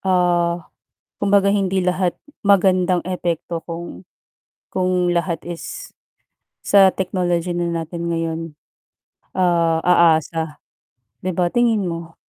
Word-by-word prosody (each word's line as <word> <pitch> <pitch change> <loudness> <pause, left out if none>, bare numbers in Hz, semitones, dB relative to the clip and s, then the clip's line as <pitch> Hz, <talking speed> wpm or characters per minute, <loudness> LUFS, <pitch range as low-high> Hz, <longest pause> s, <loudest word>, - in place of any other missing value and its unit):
ah, 175 -2 +1 0.5
kumbaga 200 -1 +3
hindi 195 -2 +1
lahat 180 0 0 0.3
magandang 185 -2 +3
epekto 175 -2 -3
kung, 165 - -7 0.7
kung 180 -1 +1
lahat 170 -1 -2
is, 170 -1 -7 0.7
sa 195 -2 +5
technology 175 -2 -1
na 175 -1 -1
natin 170 +1 -4
ngayon, 165 -1 -2 0.9
ah, 170 -3 +2
aasa 160 -2 +2 0.6
'di 185 -2 -3
ba, 175 -1 +1
tingin 230 -4 +2
mo? 165 -2 -5
175 Hz, 105 wpm, -20 LUFS, 170-185 Hz, 0.9 s, sa